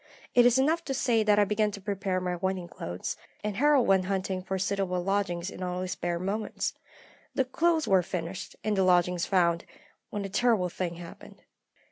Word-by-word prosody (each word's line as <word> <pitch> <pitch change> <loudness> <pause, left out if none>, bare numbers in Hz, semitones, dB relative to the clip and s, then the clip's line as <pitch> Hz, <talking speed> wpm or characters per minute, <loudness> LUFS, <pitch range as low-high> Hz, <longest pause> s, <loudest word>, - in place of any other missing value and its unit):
It 245 0 +7
is 245 +1 +4
enough 315 +6 +2
to 270 - -2
say 235 -3 +2
that 210 -1 +4
I 205 - +5
began 210 +1 +1
to 200 - -6
prepare 195 -2 -2
my 180 -1 -2
wedding 185 0 -2
clothes, 90 - -5 0.3
and 210 -1 -2
Harold 285 -1 +4
went 190 -1 +3
hunting 190 -1 -1
for 190 +1 -3
suitable 190 -1 -1
lodgings 190 -2 -1
in - - -9
all 180 0 -2
his 185 - -4
spare 175 -1 -2
moments. 200 +5 -2 0.6
The 265 - +2
clothes 325 +4 +1
were 190 -2 +5
finished, 180 +2 -5
and 215 -1 +1
the 195 - +2
lodgings 180 -1 +3
found, 170 -3 +2 0.5
when 205 -1 -4
a - - -2
terrible 210 -3 +2
thing 175 0 -3
happened. 170 0 -12
190 Hz, 190 wpm, -28 LUFS, 180-215 Hz, 0.6 s, It